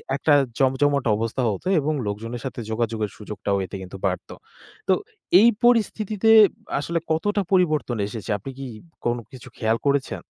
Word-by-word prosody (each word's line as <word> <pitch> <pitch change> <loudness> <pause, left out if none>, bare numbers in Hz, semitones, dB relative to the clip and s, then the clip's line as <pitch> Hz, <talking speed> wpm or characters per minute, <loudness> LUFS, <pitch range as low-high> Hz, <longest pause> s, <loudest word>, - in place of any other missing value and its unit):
একটা 145 +2 +2 0.3
জমজমাট 140 +1 +2
অবস্থা 115 +4 -2
হতো 100 - -6
এবং 155 +2 0
লোকজনের 115 +4 -5
সাথে 125 -2 -5
যোগাযোগের 110 -2 -1
সুযোগটাও 105 -1 -3
এতে 95 - -9
কিন্তু 95 +1 -9
বাড়ত। - - -4 0.6
তো - - +5 0.5
এই 230 - +7
পরিস্থিতিতে 220 -2 +3 0.5
আসলে 170 +3 -1
কতটা 205 +6 +1
পরিবর্তন 155 -10 +2
এসেছে 110 +1 -7
আপনি 120 +7 -8
কি 135 - -6 0.4
কোনো 120 0 0
কিছু 130 -3 -12
খেয়াল 110 +1 +1
করেছেন? 140 -1 0
130 Hz, 145 wpm, -23 LUFS, 110-160 Hz, 0.6 s, এই